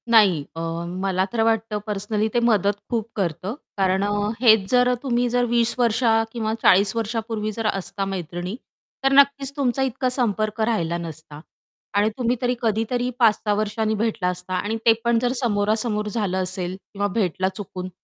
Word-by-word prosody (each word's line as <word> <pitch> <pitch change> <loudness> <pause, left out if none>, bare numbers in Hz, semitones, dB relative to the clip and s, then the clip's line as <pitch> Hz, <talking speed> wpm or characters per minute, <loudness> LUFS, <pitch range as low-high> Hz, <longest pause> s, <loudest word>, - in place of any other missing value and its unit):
नाही 200 -10 +5
अ, - - -5 0.4
मला 190 -1 +1
तर 230 - +1
वाटतं 225 -1 0
पर्सनली 210 +1 -1
ते 240 - +3
मदत 205 -2 +2
खूप 230 -2 -1
करतं. 190 +2 -2 0.2
कारण 190 0 +2
अ, 205 - 0 0.3
हेच 220 -5 +5
जर 250 0 +4
तुम्ही 245 -2 +1
जर 245 +1 +2
20 235 -1 +2
वर्षा 230 -1 +3 0.2
किंवा 220 -2 -2
40 195 +2 +5
वर्षापूर्वी 225 -1 -2
जर 225 -1 -1
असता 195 0 -2
मैत्रिणी, 175 +2 -5 0.5
तर 270 - +3
नक्कीच 280 0 +2
तुमचा 265 -1 0
इतका 255 +2 -1
संपर्क 215 -1 0
राहिला 170 -6 -1
नसता. 160 -3 -8 0.6
आणि 205 +1 +3
तुम्ही 245 -1 +1
तरी 250 0 +1
कधीतरी 230 +2 0
5-6 215 -2 +3
वर्षांनी 215 +1 -1
भेटला 215 -4 -1
असता 180 0 -4
आणि 205 +4 -1
ते 225 - +7
पण 235 -1 +3
जर 245 +1 0
समोरासमोर 210 -1 0
झालं 205 -4 -1
असेल 185 0 -3 0.2
किंवा 205 0 0
भेटला 185 -3 0
चुकून, 185 -2 -6
215 Hz, 165 wpm, -23 LUFS, 195-235 Hz, 0.6 s, ते